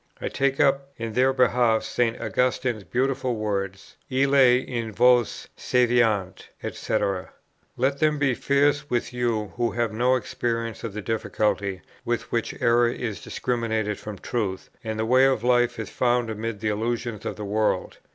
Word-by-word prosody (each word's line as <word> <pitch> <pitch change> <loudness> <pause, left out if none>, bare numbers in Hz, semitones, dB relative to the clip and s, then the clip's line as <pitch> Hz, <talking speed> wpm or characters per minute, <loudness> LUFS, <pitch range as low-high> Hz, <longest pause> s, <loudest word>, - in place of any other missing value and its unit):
I - - -3
take 135 0 0
up 140 -1 +2
in 115 -1 -4
their 130 +3 +3
behalf 125 -3 +3
St. 120 -1 0
Augustine's 125 -3 0
beautiful 130 +1 -1
words, 100 -3 -4
"Illi 130 -1 +4
in 115 -3 -3
vos 120 +1 +3
sæviant," 120 -6 +1 0.3
&c. 95 -2 -2 0.5
Let 135 +3 +1
them 155 -1 +2
be 140 -2 +2
fierce 145 +3 +1
with 120 0 -1
you 115 -5 -1
who 120 -1 +1
have 120 -2 -1
no 125 +3 +3
experience 115 -1 -3
of 115 -4 -4
the 105 0 -5
difficulty 105 -3 -1 0.2
with - - -2
which - - -2
error 120 0 +4
is 110 -5 -4
discriminated 110 -4 -2
from 105 -2 -7
truth, 95 -5 -3
and 110 -1 -3
the 110 - 0
way 130 +3 +5
of 130 -4 +2
life 120 -1 +3
is 110 -3 -5
found 120 -2 +1
amid 110 -1 -4
the 110 - 0
illusions 115 0 -2
of - - -4
the 105 - -6
world. 105 +1 -1
120 Hz, 160 wpm, -25 LUFS, 110-125 Hz, 0.5 s, way